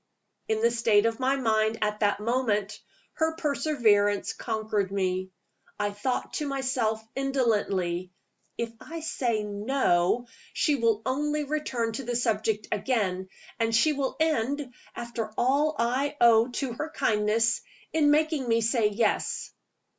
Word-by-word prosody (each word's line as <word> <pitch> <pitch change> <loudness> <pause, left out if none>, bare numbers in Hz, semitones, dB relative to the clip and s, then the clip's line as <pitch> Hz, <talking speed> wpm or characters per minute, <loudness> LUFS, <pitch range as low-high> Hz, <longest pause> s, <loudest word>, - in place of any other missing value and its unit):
In 220 0 0
the 235 - +4
state 225 -2 +3
of 230 +1 0
my 265 +1 +2
mind 220 -3 +1
at 210 0 -1
that 205 -1 +2
moment, 215 -3 -1 0.3
her 320 -1 0
perseverance 235 -10 +2
conquered 215 -4 -2
me. 185 -1 -1 0.5
I 205 0 0
thought 205 +6 -3
to 300 - -2
myself 260 -5 0 0.2
indolently, 205 -10 0 0.5
"If 230 -1 -3
I 330 +1 -7
say 235 -8 -1
No, 210 -1 +1 0.3
she 300 - +2
will 225 -4 +1
only 295 +3 0
return 270 -6 -2
to 270 - -4
the 240 0 -3
subject 220 -2 0
again, 195 -5 -1 0.3
and 225 0 +1
she 305 +7 +4
will 275 -2 -2
end 285 -3 0 0.2
(after 235 -2 -4
all 285 +5 +2
I 255 +5 0
owe 230 -1 +6
to 250 0 -3
her 305 +7 -4
kindness) 220 -1 +1 0.3
in 310 -2 +4
making 305 -3 +2
me 230 0 +3
say 225 -1 +2
Yes." 210 +1 -1
230 Hz, 140 wpm, -27 LUFS, 210-270 Hz, 0.5 s, owe